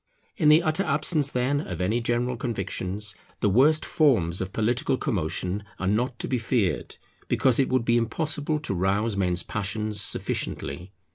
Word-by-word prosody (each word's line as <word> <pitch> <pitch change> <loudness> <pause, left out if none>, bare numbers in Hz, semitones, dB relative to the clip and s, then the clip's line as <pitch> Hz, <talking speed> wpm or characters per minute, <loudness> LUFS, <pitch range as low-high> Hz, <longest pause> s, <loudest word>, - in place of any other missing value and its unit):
In 155 -7 +3
the 155 +3 +6
utter 155 +3 +1
absence, 150 -1 +1
then, 135 +3 0
of 90 - -6
any 105 +6 +1
general 120 +2 0
convictions, 105 -2 -3 0.3
the 105 - +2
worst 150 +8 +4
forms 95 - +2
of 95 0 -4
political 120 +4 0
commotion 90 +1 -2
are 95 - -4
not 120 +6 0
to - - -4
be 125 - 0
feared, 115 -5 -1 0.3
because 130 -1 +2
it 135 - +2
would 130 -2 +1
be 120 0 +3
impossible 150 +6 -1
to 150 - -2
rouse 100 +4 0
men's 90 -3 0
passions 105 0 -2
sufficiently. 90 -1 -3
115 Hz, 160 wpm, -26 LUFS, 95-135 Hz, 0.3 s, the